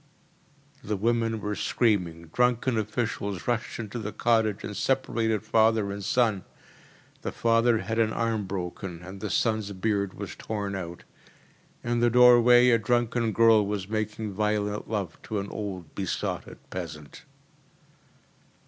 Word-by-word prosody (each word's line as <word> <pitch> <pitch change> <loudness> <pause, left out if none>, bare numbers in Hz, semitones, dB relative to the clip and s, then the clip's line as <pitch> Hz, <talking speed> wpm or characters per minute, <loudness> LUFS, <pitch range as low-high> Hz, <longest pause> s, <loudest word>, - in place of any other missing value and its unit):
‚ÄĚ - - -14
The 105 -1 -1
women 115 +1 0
were 105 +1 -2
screaming. 90 -8 0
Drunken 125 0 +2
officials 105 -3 -3
rushed 120 -2 -1
into 115 +1 -5
the 105 -1 -4
cottage 110 -3 +1
and 105 - -5
separated 115 -5 0
father 110 -2 +2
and 100 0 -6
son. 110 -2 +1 0.8
The - - -3
father 115 0 +3
had 115 +3 -2
an 110 -1 +3
arm 115 -3 -1
broken 90 -2 -5
and 95 +2 -9
the 105 - -3
son’s 110 -2 0
beard 100 0 -1
was - - -7
torn 100 -2 -4
out. 85 -2 -6 0.8
In 120 0 0
the 120 0 +4
doorway 125 0 +7
a 115 - +4
drunken 120 0 +1
girl 115 0 +5
was 100 -2 -3
making 110 -1 -3
violent 105 0 -1
love 100 -6 -3
to 110 - -4
an 100 0 -3
old 95 -7 -6
besotted 95 -3 -3
peasant. 75 -5 -7
110 Hz, 140 wpm, -27 LUFS, 100-115 Hz, 0.8 s, doorway